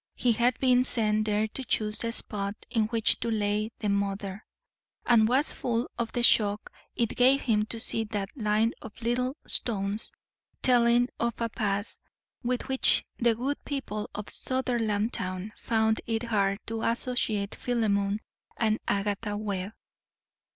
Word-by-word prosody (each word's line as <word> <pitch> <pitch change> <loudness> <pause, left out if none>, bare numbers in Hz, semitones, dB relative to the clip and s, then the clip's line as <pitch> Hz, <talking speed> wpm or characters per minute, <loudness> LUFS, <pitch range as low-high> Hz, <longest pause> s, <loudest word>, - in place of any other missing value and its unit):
He 245 - +2
had 235 +2 +2
been 250 -1 +4
sent 215 -4 +1
there 210 0 +2
to 265 - -5
choose 215 -3 +1
a 230 - -1
spot 200 -3 -1 0.2
in 225 -2 +2
which 225 0 +2
to 235 - -2
lay 210 0 0
the 210 - -2
mother, 200 0 -2 0.6
and 225 -3 +5
was 265 +6 +2
full 235 -1 -2
of 235 -1 -3
the 240 - -1
shock 210 -3 +3 0.2
it 230 -2 0
gave 260 +3 +5
him 215 -3 +1
to 230 - -4
see 225 0 +1
that 205 0 -4
line 220 -1 +1
of 220 -2 -10
little 250 +4 0
stones, 205 -1 +1 0.5
telling 245 0 +4
of 235 -1 -1
a 230 -1 -1
past 205 -1 -2 0.4
with 250 0 -2
which 265 0 +3
the 235 -1 +3
good 270 +5 -3
people 240 -7 -4
of 210 - -4
Sutherlandtown 220 -6 -1
found 220 -1 +1
it 225 0 -1
hard 200 -4 +1
to 225 0 -4
associate 230 -4 -1
Philemon 210 -4 0 0.4
and 220 -1 +1
Agatha 205 +1 -1
Webb. 200 -1 -3
220 Hz, 150 wpm, -28 LUFS, 210-240 Hz, 0.6 s, and